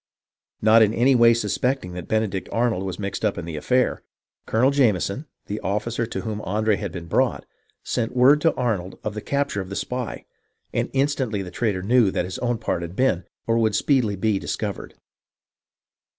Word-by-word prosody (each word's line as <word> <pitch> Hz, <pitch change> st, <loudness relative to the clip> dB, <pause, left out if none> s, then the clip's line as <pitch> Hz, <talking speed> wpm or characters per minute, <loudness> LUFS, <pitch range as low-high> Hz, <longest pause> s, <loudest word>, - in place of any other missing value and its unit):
Not 110 Hz, +1 st, +7 dB
in 110 Hz, 0 st, +4 dB
any 130 Hz, +4 st, +4 dB
way 120 Hz, -2 st, +6 dB
suspecting 115 Hz, -2 st, -1 dB
that 90 Hz, -2 st, -7 dB
Benedict 110 Hz, -4 st, -1 dB
Arnold 115 Hz, -5 st, +1 dB
was 95 Hz, -2 st, -4 dB
mixed 100 Hz, 0 st, -4 dB
up 105 Hz, -2 st, +1 dB
in 85 Hz, -, -4 dB
the 85 Hz, -2 st, -5 dB
affair. 125 Hz, +12 st, +1 dB, 0.5 s
Colonel 125 Hz, +5 st, +3 dB
Jameson, 125 Hz, -, +1 dB, 0.2 s
the 105 Hz, +1 st, -4 dB
officer 110 Hz, +4 st, -2 dB
to -, -, -4 dB
whom 105 Hz, -2 st, -4 dB
Andre 105 Hz, +2 st, +1 dB
had 100 Hz, -4 st, -4 dB
been 85 Hz, -1 st, -7 dB
brought, 85 Hz, -, 0 dB, 0.4 s
sent 120 Hz, +1 st, -2 dB
word 135 Hz, +4 st, +6 dB
to 165 Hz, -, +3 dB
Arnold 105 Hz, -8 st, -2 dB
of 105 Hz, -, -3 dB
the 105 Hz, -, -5 dB
capture 140 Hz, -6 st, -1 dB
of 95 Hz, -, -8 dB
the 100 Hz, -, -5 dB
spy, 125 Hz, +3 st, -4 dB, 0.5 s
and -, -, 0 dB
instantly 135 Hz, -7 st, 0 dB
the 90 Hz, -, -8 dB
traitor 100 Hz, -6 st, -1 dB
knew 115 Hz, 0 st, +4 dB
that 90 Hz, -, -1 dB
his 90 Hz, +7 st, -6 dB
own 120 Hz, -1 st, 0 dB
part 85 Hz, -, -2 dB
had 85 Hz, +1 st, -6 dB
been, 95 Hz, -9 st, +1 dB, 0.2 s
or 115 Hz, 0 st, +2 dB
would 110 Hz, -2 st, +2 dB
speedily 125 Hz, -8 st, +2 dB
be, 100 Hz, 0 st, 0 dB
discovered. -, -, -4 dB
110 Hz, 185 wpm, -23 LUFS, 95-125 Hz, 0.5 s, Not